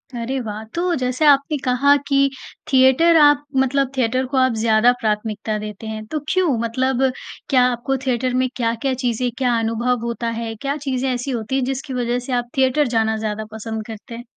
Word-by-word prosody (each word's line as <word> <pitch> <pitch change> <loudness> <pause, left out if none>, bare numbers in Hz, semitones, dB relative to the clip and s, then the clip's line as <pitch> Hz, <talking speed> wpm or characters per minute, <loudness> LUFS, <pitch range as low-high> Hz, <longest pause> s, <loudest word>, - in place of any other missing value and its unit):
अरे 250 +3 -3
वाह! 215 -2 -5
तो 350 0 0
जैसे 255 +3 -1
आपने 285 +1 +4
कहा 270 +3 +4
कि 275 -1 +3 0.4
थिएटर 265 +6 +5
आप 290 0 +5
मतलब 265 0 +1
थिएटर 255 +1 +1
को - - +1
आप 260 -2 +3
ज़्यादा 225 +2 +4
प्राथमिकता 215 0 -2
देते 210 +1 -7
हैं। 215 0 -5
तो 305 - -1
क्यों? 350 -10 +2
मतलब 255 +3 0 0.5
क्या 255 -2 +4
आपको 255 +3 -2
थिएटर 250 0 0
में - - +1
क्या-क्या 235 +2 -1
चीज़ें 245 +1 0
क्या 245 -3 +1
अनुभव 235 +1 -1
होता 235 0 -2
है 225 -1 -4
क्या 280 +1 -2
चीज़ें 260 0 0
ऐसी 250 +2 -3
होती 235 +2 -3
हैं 270 - +1
जिसकी 270 +1 -4
वजह 245 0 -1
से - - -1
आप 240 - -16
थिएटर 265 +2 +3
जाना 220 0 +1
ज़्यादा 215 0 -3
पसंद 220 0 -5
करते 225 +1 -9
हैं? 240 - -8
250 Hz, 190 wpm, -20 LUFS, 225-270 Hz, 0.5 s, थिएटर